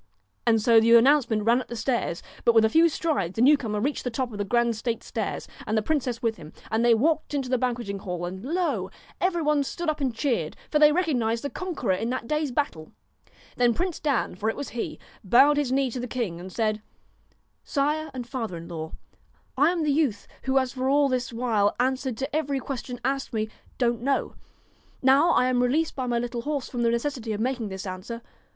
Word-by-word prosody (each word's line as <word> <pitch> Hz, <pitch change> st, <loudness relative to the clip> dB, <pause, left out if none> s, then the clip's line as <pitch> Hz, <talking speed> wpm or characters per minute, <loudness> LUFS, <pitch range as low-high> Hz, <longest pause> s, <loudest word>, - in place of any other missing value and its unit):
And 225 Hz, -1 st, +5 dB
so 225 Hz, +1 st, +6 dB
the 230 Hz, +1 st, +6 dB
announcement 235 Hz, -3 st, +4 dB
ran 235 Hz, +3 st, +3 dB
up -, -, -10 dB
the 240 Hz, -, -6 dB
stairs, 230 Hz, -7 st, -1 dB, 0.2 s
but 235 Hz, -, +4 dB
with 220 Hz, -1 st, +6 dB
a -, -, +3 dB
few 330 Hz, +7 st, +5 dB
strides 285 Hz, -, -1 dB
the 225 Hz, -, 0 dB
new 290 Hz, +4 st, +7 dB
comer 215 Hz, -7 st, -3 dB
reached 280 Hz, +7 st, -1 dB
the 250 Hz, -, -1 dB
top 250 Hz, +1 st, -2 dB
of 205 Hz, -, -7 dB
the -, -, +1 dB
grand 235 Hz, +3 st, +1 dB
state 230 Hz, +1 st, -3 dB
stairs, -, -, -4 dB, 0.2 s
and 220 Hz, 0 st, +1 dB
the 215 Hz, -, +1 dB
princess 255 Hz, -4 st, -1 dB
with 225 Hz, -1 st, 0 dB
him, 155 Hz, -1 st, -12 dB, 0.2 s
and 220 Hz, +1 st, +1 dB
they 240 Hz, -1 st, +6 dB
walked 305 Hz, +5 st, +1 dB
into 270 Hz, -3 st, -2 dB
the 255 Hz, -1 st, +1 dB
banqueting 235 Hz, -5 st, -2 dB
hall 180 Hz, -3 st, -4 dB
and 190 Hz, +3 st, -6 dB
lo! 285 Hz, -, -1 dB, 0.3 s
every 350 Hz, -2 st, +1 dB
one 300 Hz, -1 st, +3 dB
stood 330 Hz, +3 st, -2 dB
up 300 Hz, -, -8 dB
and 260 Hz, -4 st, 0 dB
cheered, 230 Hz, -, -1 dB, 0.2 s
for 300 Hz, -, +3 dB
they 300 Hz, 0 st, +7 dB
recognised 250 Hz, -10 st, 0 dB
the 285 Hz, -, -3 dB
conqueror 340 Hz, -, -2 dB
in 225 Hz, +5 st, -2 dB
that 255 Hz, -2 st, -3 dB
day's 300 Hz, -1 st, 0 dB
battle. 240 Hz, -, -3 dB, 0.6 s
Then 240 Hz, -2 st, +3 dB
Prince 360 Hz, -2 st, -2 dB
Dan, 285 Hz, -6 st, 0 dB
for 210 Hz, +4 st, -2 dB
it -, -, -2 dB
was 285 Hz, -, -5 dB
he, 240 Hz, -, -4 dB, 0.3 s
bowed 270 Hz, +9 st, +5 dB
his 285 Hz, -4 st, 0 dB
knee 265 Hz, -1 st, +1 dB
to 250 Hz, -, -4 dB
the 245 Hz, -, -4 dB
king, 220 Hz, -9 st, -3 dB
and 185 Hz, +2 st, -8 dB
said: 215 Hz, 0 st, -1 dB, 0.5 s
' -, -, -41 dB
Sire 305 Hz, +3 st, +1 dB
and 255 Hz, -2 st, -6 dB
father 230 Hz, -8 st, -4 dB
in 165 Hz, 0 st, -9 dB
law, 160 Hz, -2 st, -6 dB, 0.6 s
I 290 Hz, +4 st, +4 dB
am 345 Hz, -2 st, 0 dB
the 300 Hz, -, +2 dB
youth 275 Hz, -9 st, +1 dB, 0.2 s
who 265 Hz, 0 st, +2 dB
has 260 Hz, -1 st, +1 dB
for 260 Hz, 0 st, -1 dB
all 285 Hz, 0 st, +4 dB
this 255 Hz, -1 st, -1 dB
while 225 Hz, -4 st, +1 dB
answered 260 Hz, -1 st, 0 dB
to 270 Hz, +4 st, -3 dB
every 285 Hz, -3 st, 0 dB
question 250 Hz, -2 st, -5 dB
asked 270 Hz, -1 st, -1 dB
me, 215 Hz, -1 st, -1 dB, 0.3 s
Don't 235 Hz, -2 st, +1 dB
know. 275 Hz, +2 st, 0 dB, 0.7 s
Now 270 Hz, +6 st, +5 dB
I 250 Hz, -, +4 dB
am 255 Hz, -1 st, +2 dB
re 250 Hz, -, +2 dB
leased 315 Hz, +4 st, 0 dB
by 260 Hz, -2 st, -3 dB
my 240 Hz, -1 st, +1 dB
little 240 Hz, 0 st, -3 dB
horse 285 Hz, 0 st, -2 dB
from 245 Hz, -, -3 dB
the 235 Hz, -, +3 dB
necessity 235 Hz, -1 st, -2 dB
of 205 Hz, -, -4 dB
making 240 Hz, -2 st, -1 dB
this 190 Hz, +1 st, -6 dB
answer. 195 Hz, +5 st, -6 dB
245 Hz, 225 wpm, -26 LUFS, 225-280 Hz, 0.7 s, new